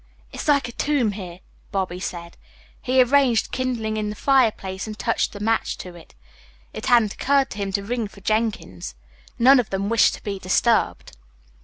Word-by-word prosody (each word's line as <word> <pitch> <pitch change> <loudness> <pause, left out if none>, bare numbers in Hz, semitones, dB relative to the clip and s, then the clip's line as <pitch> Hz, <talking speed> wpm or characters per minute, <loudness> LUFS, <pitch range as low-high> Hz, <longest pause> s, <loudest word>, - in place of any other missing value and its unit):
"It's - - -6
like 280 -3 +3
a - - -7
tomb 265 -4 0
here," 185 -3 -8 0.3
Bobby 185 -2 -2
said. 170 -2 -6 0.5
He 255 0 +4
arranged 250 -2 +2
kindling 245 -4 -2
in 210 -1 -2
the 210 - -5
fireplace 215 -8 +1
and 215 -1 -7
touched 230 -1 -1
a - - -7
match 225 +2 0
to 180 - -9
it. 165 - -16 0.6
It - - -6
hadn't 230 -4 +4
occurred 275 -1 +1
to 205 - -7
him 200 -1 -2
to 200 0 -1
ring 230 +1 -2
for 200 0 -16
Jenkins. 215 - -2 0.4
None 260 +3 +6
of 240 - -1
them 195 +1 -2
wished 230 -1 +4
to - - -15
be 200 -2 -4
disturbed. 205 - +1
215 Hz, 180 wpm, -23 LUFS, 195-245 Hz, 0.6 s, None